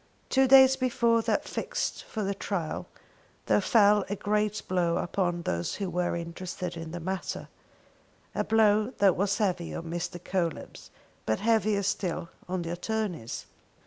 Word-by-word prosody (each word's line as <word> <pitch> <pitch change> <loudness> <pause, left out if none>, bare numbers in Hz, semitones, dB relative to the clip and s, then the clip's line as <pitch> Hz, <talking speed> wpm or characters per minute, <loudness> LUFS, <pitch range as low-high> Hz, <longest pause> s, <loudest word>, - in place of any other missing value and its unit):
Two 265 0 +4
days 265 0 +8
before 235 -3 +2
that - - 0
fixed - - -3
for 220 - -4
the 200 0 0
trial 190 -4 -3 0.6
there - - +3
fell 210 -3 +5
a 205 - -1
great 210 +1 0
blow 175 -2 +1
upon 175 -1 -1
those 85 - -2
who 195 -3 -3
were 175 0 0
interested 175 +1 -5
in 165 -1 -6
the 175 +2 -5
matter; 185 +2 -4 0.8
a - - 0
blow 215 +1 +3
that 195 -2 +4
was 200 +2 +1
heavy 180 -5 -1
on - - -4
Mr. 175 +1 -4
Coelebs 175 -2 -3 0.4
but 110 - +1
heavier 215 -2 +2
still 185 -4 -2 0.2
on 185 -1 -1
the 165 - -4
attornies. 180 - -3
190 Hz, 150 wpm, -28 LUFS, 175-215 Hz, 0.8 s, days